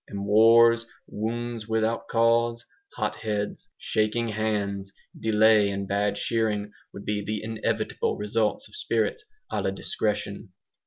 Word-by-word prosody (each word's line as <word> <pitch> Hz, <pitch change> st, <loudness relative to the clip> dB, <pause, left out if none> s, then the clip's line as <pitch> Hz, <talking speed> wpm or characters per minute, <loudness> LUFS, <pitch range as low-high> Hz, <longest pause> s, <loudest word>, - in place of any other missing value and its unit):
And 100 Hz, 0 st, -5 dB
wars, 115 Hz, +2 st, +6 dB, 0.2 s
'wounds 115 Hz, +1 st, -4 dB
without 110 Hz, +1 st, 0 dB
cause,' 115 Hz, 0 st, +2 dB, 0.3 s
hot -, -, -1 dB
heads, 105 Hz, -2 st, -3 dB
shaking 110 Hz, +2 st, 0 dB
hands, 100 Hz, -2 st, -2 dB, 0.3 s
delay 110 Hz, -1 st, +4 dB
and 100 Hz, 0 st, -3 dB
bad 100 Hz, +1 st, 0 dB
shearing, 105 Hz, -3 st, -1 dB, 0.2 s
would 100 Hz, -, -10 dB
be 105 Hz, -1 st, -1 dB
the 105 Hz, +1 st, -3 dB
inevitable 110 Hz, -1 st, -1 dB
results 105 Hz, -, -1 dB
of -, -, -14 dB
spirits 425 Hz, -, -1 dB, 0.3 s
A -, -, -1 dB
LA -, -, 0 dB
DISCRETION. -, -, -3 dB
110 Hz, 125 wpm, -26 LUFS, 105-115 Hz, 0.3 s, wars